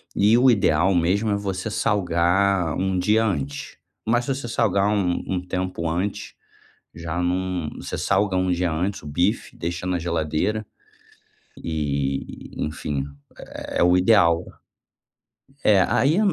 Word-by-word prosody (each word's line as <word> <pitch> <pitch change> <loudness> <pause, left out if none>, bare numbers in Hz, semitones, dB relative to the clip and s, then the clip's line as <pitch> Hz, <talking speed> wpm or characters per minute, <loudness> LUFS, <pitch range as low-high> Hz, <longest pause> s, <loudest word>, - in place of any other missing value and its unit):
E 105 +4 +4
o 130 +1 +6
ideal 95 -3 +3
mesmo 95 +6 +1
é - - +2
você 100 +1 -3
salgar 90 -3 +1
um 95 0 0
dia 110 +4 +3
antes. 70 -9 -3 0.3
Mas 120 +2 +1
se 135 - -1
você 130 -2 -6
salgar 105 -4 +1
um 95 -4 0
um 90 -1 -2
tempo 90 -2 -2
antes, 90 +5 -3 0.6
já 85 +1 -3
não 90 -2 -1
você - - -5
salga 100 -2 +1
um 90 0 +1
dia 90 0 0
antes 95 +5 -2
o 75 - -11
bife, 90 +9 -1
deixa 85 +2 -4
na 90 -1 0
geladeira, 85 +6 -1 1.0
e, 70 -4 -3
enfim, 75 -2 -3 0.7
é - - +3
o 90 +1 +5
ideal. 90 -4 +4 1.2
É, 100 -3 +5
aí 155 +8 +2
90 Hz, 135 wpm, -23 LUFS, 85-100 Hz, 1.2 s, o